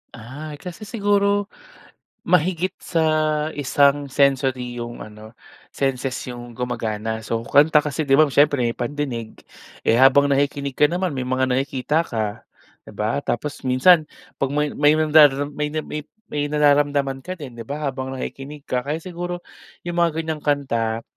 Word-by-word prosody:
Ay, 145 +7 -8
kasi 185 +4 -8
siguro, 205 -1 +1 0.8
mahigit 180 +1 +2
sa 165 -2 0 0.5
isang 140 0 +2
sensory 130 -3 +1
'yong 120 0 -6
ano, 110 +1 -12 0.4
senses 135 -1 -1 0.2
'yong 120 -1 -9
gumagana 110 -2 -3
so, 115 +1 -2
kanta 150 +2 +5
kasi 150 +1 -2
'di 135 - +4
ba? 155 - +7
Siyempre 145 -1 +3
may 115 0 0
pandinig, 120 -3 -4 0.5
eh, 115 - +4
habang 135 +2 +6
nakikinig 140 -1 0
ka 150 - +6
naman 180 -3 -1
may 130 - -3
mga 130 0 +1
nakikita 135 +4 0
ka, 110 -3 -3 0.4
'di - - -11
ba? 110 +6 -1
Tapos, 140 +5 -3
minsan, 155 +5 +5 0.4
'pag 135 - +1
may 150 0 +1
may 145 +1 +4
nandaram 150 -2 +4
may 150 0 -1
may 150 -1 -4 0.3
may 145 0 -1
nararamdaman 145 -2 +2
ka 185 - -3
din, 130 -5 -9
'di - - -5
ba 150 +2 -5
habang 130 0 -5
nakikinig 140 +2 -7
ka, 125 -1 -1
kaya 150 +2 -1
siguro, 175 0 -5 0.5
'yong 175 - -3
mga 170 -1 +4
ganyang 155 -2 -4
kanta, 115 -6 -1
140 Hz, 155 wpm, -22 LUFS, 125-155 Hz, 0.8 s, ba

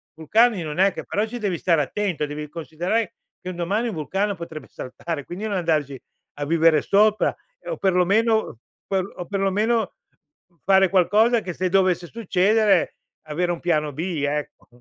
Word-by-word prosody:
Vulcani 210 +7 +3
non 155 -1 -5
è 195 +2 +4
che - - -7
però 210 +2 -1
ci 240 +2 -7
devi 200 -5 -1
stare 165 -2 +2
attento, 175 0 -2
devi 150 +1 -6
considerare 170 +8 -2 0.3
che 185 - -6
un 185 - -6
domani 195 +7 -1
un 220 - -4
vulcano 195 +6 -1
potrebbe 165 -3 -8
saltare, 145 +3 -6
quindi 185 +5 -6
non 205 - -2
andarci 155 -6 -1 0.4
a 145 - -4
vivere 160 0 +4
sopra 210 +1 +3 0.3
o - - -3
perlomeno 195 - +2 0.3
per 190 -1 0
o 180 - -6
perlomeno, 205 +3 0 0.7
fare 190 -1 +4
qualcosa 215 +6 +3
che 185 -4 -5
se 185 +2 -1
dovesse 185 -2 +2
succedere, 210 -1 +2 0.3
avere 165 +3 -1
un 170 - -6
piano 155 -4 0
B, 160 +1 -3
ecco. 150 +1 -4
185 Hz, 160 wpm, -23 LUFS, 160-210 Hz, 0.7 s, è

